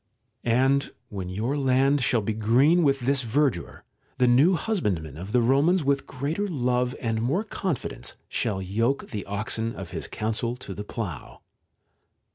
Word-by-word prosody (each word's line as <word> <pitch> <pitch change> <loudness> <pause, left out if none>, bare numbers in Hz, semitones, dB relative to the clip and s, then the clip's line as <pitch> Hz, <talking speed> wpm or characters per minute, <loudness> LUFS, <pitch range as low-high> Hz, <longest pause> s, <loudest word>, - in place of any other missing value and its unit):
And 130 +4 +2 0.2
when 95 -3 -5
your 110 +9 -1
land 135 0 +3
shall 120 -2 +2
be 110 +2 -1
green 125 +11 +4
with 140 -4 +2
this 135 +2 +2
verdure, 120 - 0 0.3
the 125 -1 +4
new 140 +10 +5
husbandman 100 - -1
of 90 +6 -7
the 125 - +4
Romans 145 +9 +3
with 140 0 +1
greater 155 +10 -2
love 125 -5 0
and 115 -2 -1
more 145 - +1
confidence 190 - -4
shall 95 -4 -2
yoke 115 +8 -1
the 105 -3 -3
oxen 110 +3 -2
of 95 -4 -7
his - - -5
counsel 115 +2 -2
to 110 -5 -8
the 105 - -6
plough. 105 - -6
125 Hz, 155 wpm, -26 LUFS, 110-140 Hz, 0.3 s, new